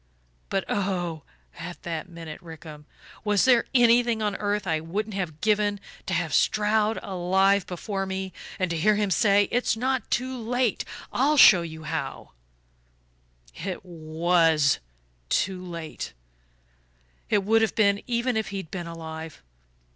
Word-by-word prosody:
But, 195 Hz, -, -1 dB
oh, 180 Hz, -5 st, -1 dB, 0.4 s
at 175 Hz, -1 st, -8 dB
that 165 Hz, 0 st, -4 dB
minute, 165 Hz, -3 st, -9 dB
Rickham, 155 Hz, -3 st, -11 dB, 0.4 s
was 210 Hz, -2 st, +3 dB
there 245 Hz, -3 st, +5 dB
anything 240 Hz, -1 st, +5 dB
on 210 Hz, -2 st, -1 dB
earth 205 Hz, 0 st, -1 dB
I 160 Hz, -3 st, 0 dB
wouldn't 205 Hz, +7 st, -4 dB
have 175 Hz, -6 st, -4 dB
given 210 Hz, -1 st, +2 dB, 0.3 s
to -, -, 0 dB
have -, -, -1 dB
Stroud 215 Hz, +1 st, +2 dB
alive 190 Hz, +1 st, +2 dB
before 195 Hz, +2 st, -3 dB
me, 190 Hz, -1 st, -4 dB, 0.2 s
and 185 Hz, -2 st, -1 dB
to 170 Hz, -, -1 dB
hear 210 Hz, +6 st, +3 dB
him 205 Hz, -2 st, 0 dB
say: 200 Hz, +2 st, +4 dB
'It's 245 Hz, -2 st, +1 dB
not 255 Hz, -1 st, -1 dB
too 260 Hz, +2 st, -1 dB
late 245 Hz, 0 st, 0 dB, 0.3 s
I'll 290 Hz, +4 st, +3 dB
show 190 Hz, -9 st, +9 dB
you 160 Hz, -1 st, -7 dB
how'? 155 Hz, -4 st, -4 dB, 1.2 s
"It 190 Hz, +1 st, -6 dB
WAS 160 Hz, -3 st, +2 dB, 0.5 s
too 185 Hz, -1 st, 0 dB
late 170 Hz, -3 st, -6 dB, 1.2 s
it 205 Hz, -1 st, +2 dB
would 225 Hz, +3 st, +3 dB
have 220 Hz, -, +1 dB
been, 200 Hz, -2 st, +3 dB
even 240 Hz, 0 st, 0 dB
if 220 Hz, -1 st, -1 dB
he'd 195 Hz, -5 st, -6 dB
been 175 Hz, -3 st, -5 dB
alive. 160 Hz, -, -8 dB
195 Hz, 140 wpm, -26 LUFS, 165-215 Hz, 1.2 s, show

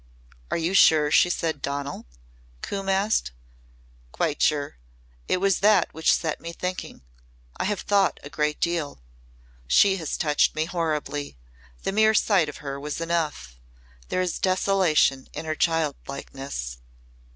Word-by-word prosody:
"Are -, -, 0 dB
you 170 Hz, +3 st, -1 dB
sure 155 Hz, -6 st, +5 dB
she 180 Hz, -, +5 dB
said 160 Hz, -4 st, -2 dB
'Donal'?" 140 Hz, -, -4 dB, 0.6 s
Coombe 195 Hz, -1 st, -4 dB
asked. 195 Hz, -, +1 dB, 0.8 s
"Quite 155 Hz, -, -1 dB
sure. 145 Hz, -, +1 dB, 0.5 s
It -, -, +2 dB
was 195 Hz, 0 st, +1 dB
that 210 Hz, +2 st, +3 dB
which 160 Hz, -, +2 dB
set 160 Hz, -2 st, -1 dB
me 170 Hz, 0 st, -6 dB
thinking. 180 Hz, -, -5 dB, 0.5 s
I -, -, -2 dB
have 205 Hz, 0 st, -1 dB
thought 200 Hz, -2 st, +2 dB
a 145 Hz, -, -8 dB
great 150 Hz, 0 st, -1 dB
deal. 160 Hz, -, -2 dB, 0.6 s
She 195 Hz, -, +5 dB
has 160 Hz, -4 st, -3 dB
touched 150 Hz, -2 st, +2 dB
me 155 Hz, -, 0 dB
horribly. 155 Hz, -, -3 dB, 0.5 s
The -, -, -1 dB
mere 220 Hz, +2 st, +4 dB
sight 190 Hz, -9 st, +3 dB
of 150 Hz, -, -8 dB
her 140 Hz, 0 st, -4 dB
was 150 Hz, +2 st, -5 dB
enough. 165 Hz, -, -2 dB, 0.5 s
There 185 Hz, -, 0 dB
is 180 Hz, -, -3 dB
desolation 185 Hz, -8 st, +2 dB
in -, -, -6 dB
her 155 Hz, -, -1 dB
childlikeness." 140 Hz, -, -3 dB
160 Hz, 140 wpm, -25 LUFS, 145-185 Hz, 0.8 s, sure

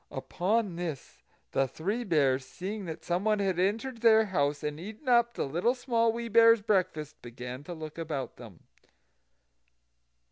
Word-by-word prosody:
Upon 185 Hz, -, -1 dB
this, 165 Hz, -7 st, -6 dB, 0.3 s
the 135 Hz, -, +1 dB
Three 200 Hz, -, -3 dB
Bears, 140 Hz, -, +2 dB
seeing 195 Hz, +9 st, -6 dB
that 160 Hz, -2 st, -7 dB
someone 200 Hz, +5 st, +1 dB
had 190 Hz, -3 st, 0 dB
entered 225 Hz, +6 st, -1 dB
their 220 Hz, -1 st, +6 dB
house, 145 Hz, -7 st, 0 dB
and 150 Hz, 0 st, -3 dB
eaten 215 Hz, -, -9 dB
up 235 Hz, -1 st, +4 dB
the -, -, -1 dB
Little 175 Hz, -, +1 dB
Small 235 Hz, -3 st, +1 dB
Wee 235 Hz, +1 st, -4 dB
Bear's 230 Hz, -1 st, +6 dB
breakfast, 175 Hz, -8 st, -1 dB
began 125 Hz, +2 st, -8 dB
to 175 Hz, -, -6 dB
look 155 Hz, 0 st, -8 dB
about 150 Hz, -5 st, -4 dB
them. 110 Hz, -8 st, -12 dB
180 Hz, 150 wpm, -29 LUFS, 150-225 Hz, 0.3 s, their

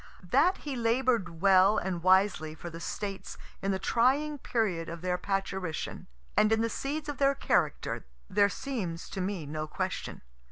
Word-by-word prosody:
That 320 Hz, +8 st, +4 dB
he 285 Hz, -3 st, -4 dB
labor'd 230 Hz, -7 st, +1 dB
well 195 Hz, +1 st, +6 dB
and 180 Hz, -2 st, -2 dB
wisely 185 Hz, -4 st, +3 dB
for 175 Hz, +1 st, -8 dB
the 165 Hz, -, -8 dB
States 195 Hz, +2 st, -5 dB, 0.2 s
in 195 Hz, -, -1 dB
the 190 Hz, -, +1 dB
trying 270 Hz, +9 st, +2 dB
period 195 Hz, -10 st, -1 dB
of 165 Hz, 0 st, -7 dB
their 180 Hz, 0 st, 0 dB
parturition, 190 Hz, -4 st, -3 dB, 0.3 s
and 215 Hz, -, +4 dB
in 220 Hz, 0 st, +3 dB
the 230 Hz, 0 st, 0 dB
seeds 300 Hz, +3 st, -3 dB
of 290 Hz, -2 st, -5 dB
their 275 Hz, 0 st, +4 dB
character, 160 Hz, -, 0 dB, 0.2 s
there 200 Hz, +1 st, +3 dB
seems 190 Hz, -8 st, -4 dB
to 190 Hz, -, -3 dB
me 185 Hz, -4 st, -2 dB
no 155 Hz, +1 st, -4 dB
question. -, -, -4 dB
195 Hz, 165 wpm, -30 LUFS, 175-240 Hz, 0.3 s, well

